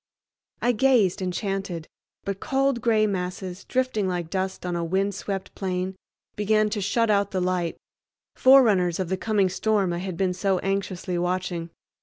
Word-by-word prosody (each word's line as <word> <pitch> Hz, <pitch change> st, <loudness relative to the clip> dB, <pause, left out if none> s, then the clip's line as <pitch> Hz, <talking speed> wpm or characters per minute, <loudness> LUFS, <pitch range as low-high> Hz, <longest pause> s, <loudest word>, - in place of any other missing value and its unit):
I 245 Hz, -, +4 dB
gazed 240 Hz, -7 st, +3 dB
enchanted, 185 Hz, -2 st, -3 dB, 0.4 s
but 195 Hz, -1 st, -3 dB
cold 270 Hz, -2 st, +1 dB
gray 220 Hz, -2 st, +3 dB
masses, 185 Hz, -2 st, -4 dB
drifting 255 Hz, -6 st, 0 dB
like 175 Hz, -3 st, -3 dB
dust 190 Hz, -1 st, -2 dB
on 175 Hz, -1 st, -2 dB
a 170 Hz, -, -1 dB
wind 190 Hz, +4 st, 0 dB
swept 195 Hz, 0 st, -5 dB
plain, 185 Hz, 0 st, -3 dB, 0.4 s
began 215 Hz, 0 st, +2 dB
to 210 Hz, -1 st, -1 dB
shut 220 Hz, +3 st, +2 dB
out 200 Hz, -1 st, +2 dB
the 190 Hz, -, -2 dB
light, 180 Hz, -2 st, -1 dB, 0.6 s
forerunners 210 Hz, -10 st, +5 dB
of 185 Hz, -3 st, -2 dB
the 190 Hz, -, +1 dB
coming 205 Hz, -2 st, +2 dB
storm 195 Hz, -1 st, +1 dB
I 170 Hz, -, -2 dB
had 185 Hz, -2 st, -5 dB
been 185 Hz, -1 st, +1 dB
so 190 Hz, +1 st, +1 dB
anxiously 190 Hz, -2 st, -2 dB
watching. 175 Hz, -1 st, -2 dB
190 Hz, 160 wpm, -25 LUFS, 180-210 Hz, 0.6 s, forerunners